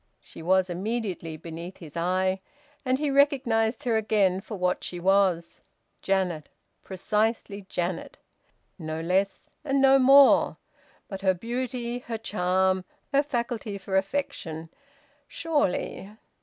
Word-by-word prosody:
She - - -12
was 185 +2 +3
immediately 185 -3 -3
beneath 170 +3 -8
his 155 -5 -12
eye, 185 +2 0 0.4
and 255 0 +1
he 295 0 -1
recognised 255 -5 +2
her 235 -3 +2
again 200 -4 +2
for 215 0 -7
what 180 0 0
she 175 - -5
was 185 -2 +2 0.4
Janet! 180 -6 -1 0.3
Precisely 205 +1 -1
Janet 175 0 -3 0.6
no 155 -1 -4
less 190 +4 -1
and 275 -1 +1
no 270 0 +6
more! 275 +1 +6 0.5
But 195 -2 -7
her 190 -1 +3
beauty, 240 +3 -3
her 235 -2 -5
charm, 185 -2 +1 0.3
her 280 - +5
faculty 235 -6 -3
for 195 0 -4
affection 190 - -2 0.6
surely... 290 - -1
195 Hz, 120 wpm, -26 LUFS, 180-240 Hz, 0.6 s, no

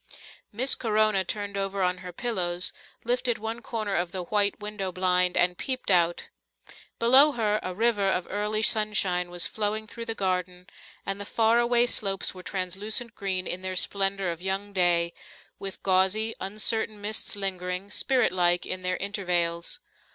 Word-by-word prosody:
Miss 255 +6 +3
Corona 215 -4 +2
turned 205 +1 -5
over 195 0 -2
on 180 0 0
her 180 -1 -8
pillows, 180 -5 0 0.3
lifted 240 0 0
one 225 +2 -5
corner 215 -4 -4
of 175 -1 -1
the 185 -1 -4
white 205 +2 +1
window 210 -2 -4
blind 180 0 +2
and 180 0 +2
peeped 255 -5 -2
out. 175 -1 +2 0.7
Below 265 +6 +6
her 215 -3 0
a 185 0 -5
river 215 -2 +1
of 185 -1 -1
early 210 +1 -1
sunshine 195 -5 +2
was 175 -1 +2
flowing 215 0 -2
through 230 +2 -8
the 225 - -4
garden, 180 -2 -2 0.4
and 195 +1 -3
the - - -3
far 225 +3 +2
away 240 0 +3
slopes 195 -5 +1
were 185 - -10
translucent 200 +6 -2
green 190 -3 -2
in 180 - -2
their 185 0 -4
splendour 195 0 +1
of 170 0 -5
young 195 +2 -3
day, 170 -2 +2 0.5
with 195 -1 -7
gauzy, 195 +4 +2
uncertain 215 +2 +1
mists 210 +1 -2
lingering, 185 0 -3
spiritlike, 180 -9 +2
in 185 - -3
their 185 0 -1
intervales. 175 -4 -2
195 Hz, 160 wpm, -26 LUFS, 180-215 Hz, 0.7 s, Below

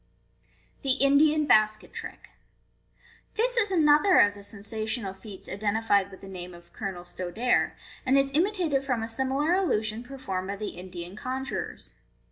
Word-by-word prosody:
Fig. 270 -2 +2
soo. - - -3
The - - +1
Indian 300 +2 +4
Basket 215 -5 +3
Trick. - - -8 0.5
— 475 -1 -31
This - - +1
is 445 -4 +2
another 320 +1 +5
of 205 - +6
the 205 - -12
sensational 215 +1 -3
feats 195 0 -11
identified 205 0 +1
with 190 - -13
the 195 - -10
name 180 -2 -8
of 170 0 -17
Colonel 190 -4 -5
Stodare 185 +7 0 0.3
and 265 +1 +3
is 275 0 +2
imitated 335 -4 +1
from 250 -4 -1
a - - -3
similar 265 +7 0
illusion 220 - 0
performed 240 -8 -5
by 200 - -3
the 210 +1 -4
Indian 180 0 -8
conjurors. 260 +4 -5
225 Hz, 160 wpm, -27 LUFS, 200-280 Hz, 0.5 s, of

